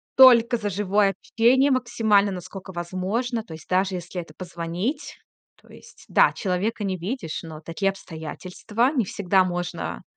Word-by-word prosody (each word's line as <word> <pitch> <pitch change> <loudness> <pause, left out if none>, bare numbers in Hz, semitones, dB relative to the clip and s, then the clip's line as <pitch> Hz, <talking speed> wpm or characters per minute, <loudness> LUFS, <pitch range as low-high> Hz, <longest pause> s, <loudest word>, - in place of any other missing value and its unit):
только 240 -2 +7
за 210 -2 -3
живое 200 0 +1 0.2
общение 260 +5 +5
максимально, 225 -5 +2
насколько 185 +1 -8
возможно. 190 +8 -2
То 210 - -11
есть, 160 - -11
даже 185 +1 +1
если 180 0 -5
это 160 -2 -14
позвонить. 180 - -4 0.4
То - - -23
есть, - - -16
да, - - +5
человека 200 +2 -2
не 190 -2 -1
видишь, 185 - -4
но 160 -2 -8
такие 165 +5 -1
обстоятельства 190 - -3
не 245 -7 +1
всегда 190 0 +2
можно 175 -1 -4
195 Hz, 150 wpm, -24 LUFS, 180-230 Hz, 0.4 s, только